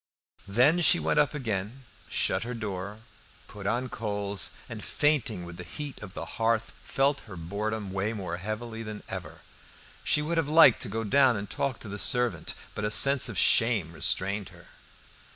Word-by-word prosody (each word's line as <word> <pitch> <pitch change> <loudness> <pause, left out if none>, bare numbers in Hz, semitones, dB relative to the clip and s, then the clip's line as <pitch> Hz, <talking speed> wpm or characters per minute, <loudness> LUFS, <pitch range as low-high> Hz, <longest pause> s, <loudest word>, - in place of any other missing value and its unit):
Then 130 - +4
she 175 - +6
went 150 - +1
up 150 0 +2
again, 115 0 -4 0.2
shut - - +1
her 120 +1 -4
door, 105 -1 -5 0.5
put 100 -1 -7
on 120 +4 0
coals, 100 -5 -2
and 110 -2 -7
fainting 125 - 0
with 85 0 -9
the 90 - -7
heat 145 - -7
of 105 -2 -9
the - - -4 0.2
hearth, 115 0 +1
felt 140 +1 +1
her 95 - -8
boredom 100 +4 -3
weigh 100 +3 -1
more 90 -5 -4
heavily 110 +4 -5
than 105 -1 -7
ever. - - -7 0.6
She 150 - +2
would 165 +2 -2
have 155 -3 -1
liked 155 -6 +7
to - - -1
go 115 +2 -2
down 130 +1 +4
and 100 0 -5
talk 135 +2 -2
to - - -9
the 100 0 -5
servant, 125 -1 -1 0.2
but 105 - -5
a 105 - +1
sense 135 +5 +5
of - - -5
shame 110 -8 +3
restrained 100 +4 0
her. - - -17
110 Hz, 180 wpm, -28 LUFS, 100-130 Hz, 0.6 s, liked